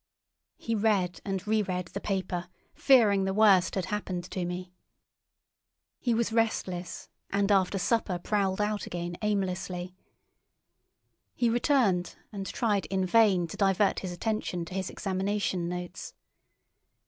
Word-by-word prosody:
He 230 Hz, -, -3 dB
read 205 Hz, -5 st, +1 dB
and 195 Hz, 0 st, -3 dB
re 215 Hz, 0 st, +3 dB
read 180 Hz, -3 st, -3 dB
the 200 Hz, -, -6 dB
paper, 185 Hz, -3 st, -2 dB, 0.2 s
fearing 210 Hz, -8 st, +4 dB
the 190 Hz, 0 st, -1 dB
worst 200 Hz, -5 st, +5 dB
had 190 Hz, -3 st, -1 dB
happened 185 Hz, -4 st, -3 dB
to 185 Hz, -2 st, -2 dB
me. 180 Hz, +1 st, -5 dB, 1.3 s
He 240 Hz, -3 st, +1 dB
was 230 Hz, 0 st, 0 dB
restless, 190 Hz, -6 st, -1 dB, 0.2 s
and 200 Hz, +1 st, +1 dB
after 195 Hz, 0 st, +3 dB
supper 195 Hz, -2 st, 0 dB
prowled 195 Hz, +1 st, 0 dB
out 210 Hz, 0 st, -1 dB
again 175 Hz, 0 st, -4 dB
aimlessly. 190 Hz, -3 st, -2 dB, 1.4 s
He 235 Hz, -2 st, +2 dB
returned 235 Hz, -8 st, +2 dB, 0.2 s
and 195 Hz, -2 st, -5 dB
tried 210 Hz, -4 st, 0 dB
in 190 Hz, -1 st, 0 dB
vain 195 Hz, -3 st, +4 dB
to -, -, -7 dB
divert 195 Hz, 0 st, +2 dB
his 185 Hz, -, -5 dB
attention 180 Hz, -2 st, -2 dB
to 175 Hz, -, -10 dB
his 190 Hz, -1 st, -2 dB
examination 190 Hz, -2 st, -1 dB
notes. 180 Hz, 0 st, -6 dB
195 Hz, 135 wpm, -29 LUFS, 180-210 Hz, 1.4 s, worst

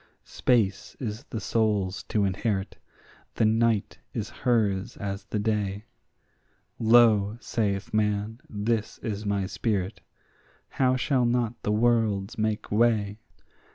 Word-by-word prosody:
Space 105 Hz, -4 st, 0 dB
is 110 Hz, -3 st, -5 dB
the 115 Hz, -, -5 dB
soul's 105 Hz, -3 st, 0 dB
to 105 Hz, -2 st, +1 dB
inherit; 95 Hz, +1 st, -2 dB, 0.6 s
the 110 Hz, -, +2 dB
night 110 Hz, -1 st, +1 dB, 0.2 s
is -, -, -3 dB
hers 110 Hz, -3 st, 0 dB
as 100 Hz, -1 st, -4 dB
the 105 Hz, -, -3 dB
day; 105 Hz, -1 st, -1 dB, 0.9 s
Lo, 110 Hz, -2 st, +5 dB
saith 100 Hz, -5 st, -2 dB
man, 105 Hz, +2 st, 0 dB
this 110 Hz, 0 st, -1 dB
is 105 Hz, -2 st, -3 dB
my 100 Hz, -1 st, 0 dB
spirit; 100 Hz, -1 st, -2 dB, 0.7 s
how 130 Hz, -1 st, +2 dB
shall 130 Hz, -1 st, +1 dB
not 120 Hz, -1 st, 0 dB
the 105 Hz, -, -1 dB
worlds 110 Hz, -3 st, +2 dB
make 110 Hz, -1 st, -2 dB
way? 105 Hz, -2 st, +2 dB
105 Hz, 120 wpm, -27 LUFS, 100-115 Hz, 0.9 s, Lo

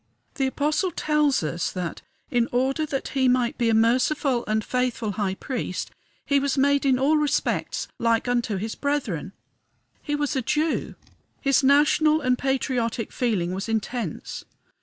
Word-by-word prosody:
The 270 Hz, -3 st, 0 dB
Apostle 300 Hz, +7 st, 0 dB
tells 300 Hz, -, +1 dB
us 170 Hz, +3 st, -2 dB
that, 180 Hz, -3 st, -4 dB, 0.3 s
in 240 Hz, -1 st, +2 dB
order 270 Hz, +5 st, 0 dB
that 270 Hz, -2 st, -3 dB
he 265 Hz, -2 st, +1 dB
might 250 Hz, +1 st, +1 dB
be 235 Hz, -1 st, +2 dB
a 225 Hz, -, +3 dB
merciful 250 Hz, +3 st, +2 dB
and 215 Hz, 0 st, 0 dB
faithful 250 Hz, -3 st, -1 dB
high 195 Hz, -1 st, -2 dB
priest, 230 Hz, -6 st, -4 dB, 0.3 s
he 280 Hz, -1 st, +3 dB
was 275 Hz, 0 st, -1 dB
made 280 Hz, +1 st, +3 dB
in 260 Hz, -1 st, +4 dB
all 285 Hz, +4 st, +3 dB
respects 300 Hz, -1 st, 0 dB
like 230 Hz, 0 st, +1 dB
unto 240 Hz, -4 st, 0 dB
his 220 Hz, +4 st, -3 dB
brethren. 245 Hz, -, -2 dB, 0.7 s
He 295 Hz, -, -2 dB
was 295 Hz, 0 st, -1 dB
a 265 Hz, -, +1 dB
Jew. 305 Hz, +6 st, -1 dB, 0.4 s
His 275 Hz, -1 st, +3 dB
national 300 Hz, +3 st, +4 dB
and 255 Hz, -4 st, +2 dB
patriotic 250 Hz, -4 st, -1 dB
feeling 195 Hz, -8 st, -1 dB
was 195 Hz, +4 st, -4 dB
intense. 225 Hz, -, -3 dB
255 Hz, 155 wpm, -24 LUFS, 225-285 Hz, 0.7 s, in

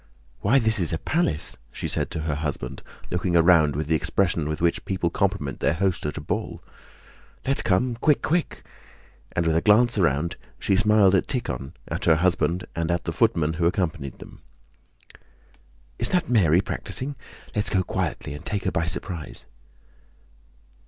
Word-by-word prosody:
"Why, 135 Hz, -, +3 dB
this 110 Hz, -4 st, +3 dB
is 85 Hz, -, 0 dB
a 80 Hz, -, 0 dB
palace!" 155 Hz, -, 0 dB
she -, -, -4 dB
said -, -, -1 dB
to 80 Hz, -, -4 dB
her 75 Hz, -1 st, -1 dB
husband, 70 Hz, -4 st, -4 dB, 0.3 s
looking 90 Hz, 0 st, 0 dB
around 85 Hz, -4 st, +5 dB
with 75 Hz, +2 st, -2 dB
the 80 Hz, -, 0 dB
expression 85 Hz, 0 st, 0 dB
with 75 Hz, -, -3 dB
which 85 Hz, 0 st, +1 dB
people 90 Hz, -3 st, -1 dB
compliment 95 Hz, -9 st, -1 dB
their 70 Hz, -, +1 dB
host 95 Hz, -3 st, 0 dB
at 75 Hz, -, -4 dB
a -, -, -4 dB
ball. 75 Hz, -, -4 dB, 0.8 s
"Let's 135 Hz, +1 st, +2 dB
come, 115 Hz, +6 st, +1 dB
quick, 150 Hz, +4 st, +2 dB
quick!" 170 Hz, +1 st, -1 dB, 0.7 s
And 85 Hz, -, 0 dB
with 80 Hz, -1 st, +2 dB
a 80 Hz, -, +3 dB
glance 110 Hz, +3 st, +4 dB
round, 85 Hz, -1 st, +1 dB, 0.2 s
she 100 Hz, -, +1 dB
smiled 105 Hz, -1 st, +4 dB
at 95 Hz, -, +2 dB
Tíkhon, 110 Hz, -, -3 dB
at -, -, -3 dB
her 80 Hz, -, +5 dB
husband, 90 Hz, +1 st, +1 dB
and 85 Hz, 0 st, -1 dB
at 85 Hz, 0 st, 0 dB
the 85 Hz, -, -3 dB
footman 85 Hz, -7 st, +2 dB
who 85 Hz, -, +4 dB
accompanied 80 Hz, -, -2 dB
them. -, -, -13 dB, 1.6 s
"Is -, -, +3 dB
that 180 Hz, -2 st, +1 dB
Mary 95 Hz, -8 st, +4 dB
practicing? 135 Hz, +7 st, -2 dB, 0.4 s
Let's 105 Hz, 0 st, +2 dB
go 95 Hz, -3 st, +1 dB
quietly 80 Hz, -, -3 dB
and 75 Hz, -, -8 dB
take 105 Hz, -2 st, -3 dB
her -, -, 0 dB
by 80 Hz, 0 st, -1 dB
surprise." 85 Hz, -2 st, -4 dB
85 Hz, 170 wpm, -24 LUFS, 80-105 Hz, 1.6 s, around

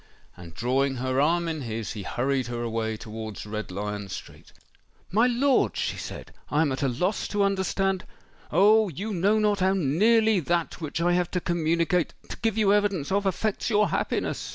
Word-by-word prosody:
And 85 Hz, -2 st, -12 dB
drawing 135 Hz, +3 st, +1 dB
her 130 Hz, +1 st, 0 dB
arm 170 Hz, +3 st, +2 dB
in 160 Hz, -2 st, -3 dB
his, 115 Hz, -3 st, -4 dB
he 105 Hz, -, -6 dB
hurried 130 Hz, +5 st, -1 dB
her 120 Hz, -1 st, -4 dB
away 110 Hz, -1 st, -2 dB
towards 110 Hz, -1 st, -7 dB
Red 110 Hz, 0 st, -5 dB
Lion 105 Hz, +1 st, -4 dB
Street. 95 Hz, -, -9 dB, 0.6 s
"My 225 Hz, +6 st, +4 dB
lord," 255 Hz, +2 st, +2 dB
she -, -, -1 dB
said, -, -, -8 dB, 0.2 s
"I 150 Hz, -, +2 dB
am 145 Hz, -, 0 dB
at 130 Hz, -, -3 dB
a 140 Hz, -, +2 dB
loss 180 Hz, -, -1 dB
to 205 Hz, -1 st, 0 dB
understand——" 195 Hz, -1 st, 0 dB, 0.5 s
"Oh! 210 Hz, +5 st, +5 dB
you 200 Hz, +8 st, -5 dB
know 200 Hz, +4 st, +2 dB
not 210 Hz, -1 st, +2 dB
how 190 Hz, +1 st, +3 dB
nearly 210 Hz, +7 st, +3 dB
that 170 Hz, +1 st, -1 dB
which 155 Hz, +1 st, -3 dB
I 175 Hz, +1 st, +3 dB
have 175 Hz, -1 st, +1 dB
to 180 Hz, -, -1 dB
communicate—to 170 Hz, 0 st, -1 dB
give 225 Hz, -1 st, -1 dB
you 205 Hz, -2 st, +4 dB
evidence 200 Hz, -8 st, +1 dB
of—affects 200 Hz, +2 st, 0 dB
your 210 Hz, -1 st, +3 dB
happiness!" -, -, -2 dB
170 Hz, 175 wpm, -26 LUFS, 125-200 Hz, 0.6 s, Oh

